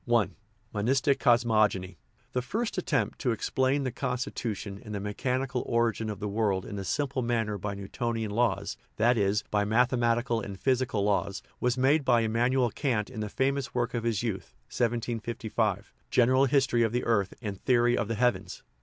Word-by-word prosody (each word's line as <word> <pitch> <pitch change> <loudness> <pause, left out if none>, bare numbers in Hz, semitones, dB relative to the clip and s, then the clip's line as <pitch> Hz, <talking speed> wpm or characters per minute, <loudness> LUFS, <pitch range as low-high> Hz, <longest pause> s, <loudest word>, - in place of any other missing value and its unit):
L 120 -3 +4 0.5
MONISTIC 130 +6 +2
COSMOGONY 110 -6 +2 0.4
The 125 - +1
first 220 - -2
attempt 150 -6 -1
to 125 - 0
explain 130 +5 0
the 130 - -1
constitution 115 -5 -4
and 105 -1 -6
the - - -2
mechanical 125 +5 -2
origin 115 -2 +1
of 105 - -5
the 105 - -3
world 100 -2 0
in 100 -2 -5
a - - -4
simple 140 +4 -1
manner 115 -3 0
by 100 +2 -3
"Newtonian 110 +2 -3
laws" 100 -3 0 0.2
that 120 +3 +3
is, 105 -1 +1
by 105 -1 +2
mathematical 120 +1 +2
and 100 -2 -7
physical 130 -5 +1
laws 100 -1 0 0.2
was 125 +1 +1
made 140 +4 +3
by 120 -3 +4
Immanuel 120 +2 +2
Kant 120 -4 -1
in 115 - -7
the 105 -1 -3
famous 135 +3 -1
work 120 -1 0
of 120 -2 -2
his 115 -2 0
youth 100 -6 -4 0.2
(1755), 115 -3 -1 0.2
General 130 +2 +4
History 130 -3 +2
of 115 -2 +2
the 125 +1 -1
Earth 100 -5 +1
and 105 -5 -6
Theory 120 -1 +3
of 115 - -1
the 115 - -2
Heavens. 125 +2 0
115 Hz, 170 wpm, -28 LUFS, 105-125 Hz, 0.5 s, L